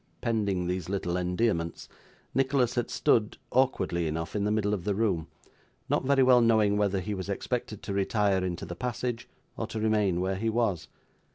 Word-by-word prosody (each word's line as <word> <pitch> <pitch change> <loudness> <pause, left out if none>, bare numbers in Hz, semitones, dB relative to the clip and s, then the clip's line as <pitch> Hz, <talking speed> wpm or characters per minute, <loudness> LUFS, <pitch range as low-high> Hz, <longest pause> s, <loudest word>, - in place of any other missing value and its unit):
Pending 100 -6 0
these 90 -1 -3
little 95 -3 -1
endearments, 90 -1 -1 0.5
Nicholas 130 -2 +2
had 120 -1 -1
stood, 110 -2 +2
awkwardly 95 -10 +1
enough, 80 +4 -4
in 100 -1 0
the 105 - +1
middle 105 -1 +1
of 95 -4 -2
the 100 0 0
room: 95 -7 0 0.6
not - - +1
very 135 0 +4
well 125 -1 +6
knowing 110 -3 +4
whether 100 -2 +1
he 105 +3 -3
was 95 0 -5
expected 110 +1 -3
to 100 - -4
retire 100 -1 +1
into 90 -2 -3
the - - -6
passage, 120 +2 -3 0.3
or - - -3
to 110 - -5
remain 105 -5 +2
where 95 +1 -1
he 115 +3 0
was. 110 -7 0
105 Hz, 180 wpm, -28 LUFS, 90-115 Hz, 0.6 s, well